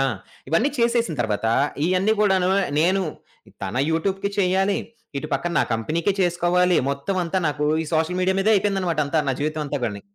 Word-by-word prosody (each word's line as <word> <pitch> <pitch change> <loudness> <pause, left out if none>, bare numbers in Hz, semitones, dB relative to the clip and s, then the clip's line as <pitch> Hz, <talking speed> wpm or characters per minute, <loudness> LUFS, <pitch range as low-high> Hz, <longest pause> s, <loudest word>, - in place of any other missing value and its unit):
ఆ! - - +3 0.5
ఇవన్నీ 220 - +2
చేసేసిన 235 -7 +1
తర్వాత 110 -1 -1 0.4
ఇయన్నీ 185 +4 +2
కూడాను 190 -3 +3 0.3
నేను 185 +3 +2 0.6
తన 95 +5 -4
యూట్యూబ్‌కి 195 +4 -1
చేయాలి. 190 +1 +2 0.4
ఇటు 155 - -6
పక్కన 175 0 -1
నా - - +4
కంపెనీకే 160 - -1
చేసుకోవాలి. 180 0 +2
మొత్తం 140 +8 -3
అంతా 185 +3 -1
నాకు 150 0 -2 0.2
ఈ - - -6
సోషల్ 160 +3 0
మీడియా 190 +1 +1
మీదే 220 +3 +3
అయిపోయిందన్నమాట 190 -5 0
అంతా. 155 +2 +1
నా - - +2
జీవితం 155 +1 -1
అంతా 145 0 -2
గాని. 100 -2 -5
180 Hz, 165 wpm, -23 LUFS, 155-195 Hz, 0.6 s, నా